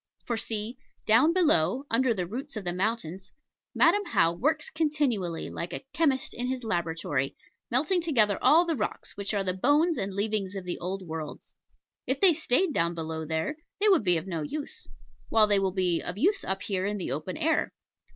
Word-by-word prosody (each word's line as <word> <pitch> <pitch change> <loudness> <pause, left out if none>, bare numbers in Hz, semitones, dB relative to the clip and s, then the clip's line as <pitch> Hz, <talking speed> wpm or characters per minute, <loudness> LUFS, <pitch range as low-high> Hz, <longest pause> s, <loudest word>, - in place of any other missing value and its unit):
For 235 - -1
see 225 +2 -4 0.3
down 255 +9 +5
below, 270 - +2
under 255 +2 +3
the 185 -6 -1
roots 260 - -6
of 215 - -4
the 175 -1 -2
mountains, 190 -2 -3 0.4
Madam 410 - +4
How 165 - +2
works 300 - 0
continually 285 - -1
like 175 +1 -5
a - - -6
chemist 280 -6 +1
in 245 +1 -3
his 255 -1 -3
laboratory, 165 -8 -1 0.3
melting 310 +9 +2
together 225 - +2
all 335 +3 +6
the 330 -2 0
rocks, 210 -6 -4
which 200 0 -4
are 200 -2 0
the 185 -1 -1
bones 295 - +2
and 195 +1 -2
leavings 200 -1 -1
of 195 - -4
the 175 - -4
old 190 +2 -4
worlds. 160 -3 -7 0.5
If 265 +2 0
they 380 -4 +6
stayed 315 +2 +1
down 170 -3 +1
below 160 -1 -4
there, 160 - -2 0.2
they 420 +1 +4
would 370 - +4
be 180 -3 +3
of 160 - -4
no 170 -4 -3
use; 290 - -5 0.4
while 220 -1 +5
they 205 -1 +3
will 195 -1 +1
be 180 -3 +1
of 180 - -5
use 390 - +2
up 190 0 -3
here 190 -1 -1
in 205 0 -2
the 180 - -4
open 155 +7 -4
air. 320 +1 +1
210 Hz, 195 wpm, -28 LUFS, 180-285 Hz, 0.5 s, all